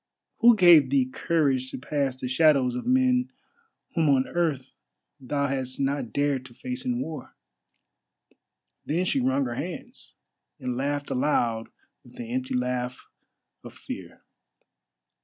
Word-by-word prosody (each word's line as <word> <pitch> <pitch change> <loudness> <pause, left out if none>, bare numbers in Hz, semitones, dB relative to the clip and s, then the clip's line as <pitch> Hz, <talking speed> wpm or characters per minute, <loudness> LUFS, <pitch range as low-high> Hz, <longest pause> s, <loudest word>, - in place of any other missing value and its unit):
Who 235 0 +7
gave 170 -8 +7
thee 135 -1 +3
courage 135 -1 0
to - - -6
pass 135 0 -2
the 130 -1 -5
shadows 135 -2 +3
of 125 - -5
men 255 0 +3 0.6
whom 160 -3 +2
on 135 -1 +3
earth 155 -7 -2 0.5
thou 140 +2 -1
hadst 130 -2 -3
not 140 -3 -1
dared 140 -2 0
to 120 -2 -14
face 125 0 -5
in 125 -1 -1
war?" 145 0 -6 1.5
Then 170 +5 -1
she 140 - +1
wrung 130 +2 +1
her 120 - -3
hands, 170 +8 -7 0.4
and 125 -1 -3
laughed 145 +2 -2
aloud 120 -4 0 0.3
with - - -18
the 115 -1 -7
empty 130 0 -2
laugh 125 0 -2 0.6
of - - -11
fear. - - -9
135 Hz, 140 wpm, -26 LUFS, 125-150 Hz, 1.5 s, Who